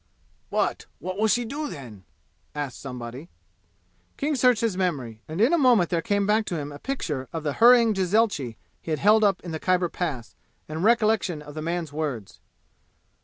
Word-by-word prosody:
"But - - -1
what 185 +2 -5
will 220 - +3
she 240 +2 +2
do 290 +5 -4
then?" 115 - -10 0.5
asked 145 -3 -4
somebody. 125 +4 -7 0.9
King 300 +1 0
searched 250 -3 +3
his 225 -5 0
memory, 135 - -2
and 155 +3 -5
in 235 +9 +4
a 340 - +4
moment 240 - +4
there 170 -2 +1
came 200 +3 0
back 215 +2 +2
to 175 - -3
him 145 -1 -5
a 145 - -9
picture 150 - -4
of 165 -2 -4
the 145 -2 -1
hurrying 235 -2 +7
jezailchi 190 - +1 0.2
he - - -9
had 155 -2 0
held 215 +4 +5
up 200 -2 +3
in 175 - -6
the 160 - -4
Khyber 180 0 +1
Pass, 140 -11 -4 0.3
and 155 +2 -4
recollection 215 -8 +2
of 145 0 -11
the 155 - -5
man's 165 -2 -3
words. 140 -10 -4
175 Hz, 185 wpm, -25 LUFS, 145-220 Hz, 0.9 s, hurrying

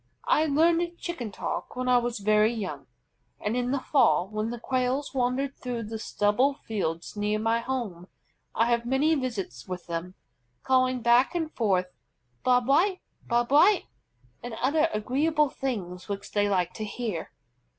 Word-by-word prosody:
I 310 - +3
learned 335 +3 +2
Chicken 255 - -5
talk - - -4
when 255 0 -3
I 250 -1 +5
was 240 0 -2
very 215 +2 +3
young; 215 -6 -5 0.5
and 210 +3 -2
in 245 0 0
the 275 +1 0
fall, 175 - +3
when 215 +2 -3
the 240 0 -5
Quails 255 +3 -1
wander 255 +1 +1
through 250 -3 -5
the 220 +1 -6
stubble 230 +7 +1
fields 185 - -4
near 210 +1 0
my 225 +2 +1
home, 230 -9 -4 0.5
I 230 - +3
have 235 0 +2
many 275 +5 +3
visits 225 - -3
with 180 -1 -6
them, 170 +2 -5 0.5
calling 255 -2 +2
back 240 +7 +4
and 320 -2 -2
forth 185 -5 +1 0.5
"Bob 250 -1 +3
White! 365 - +3 0.3
Bob 240 +1 +1
White!" 355 +7 +5 0.6
and 240 -1 -6
other 305 +7 +2
agreeable 290 +7 +1
things 185 -9 -4
which 200 0 -5
they 205 -1 +1
like 180 -3 0
to 220 - -5
hear. 215 -3 -4
240 Hz, 160 wpm, -27 LUFS, 205-270 Hz, 0.6 s, I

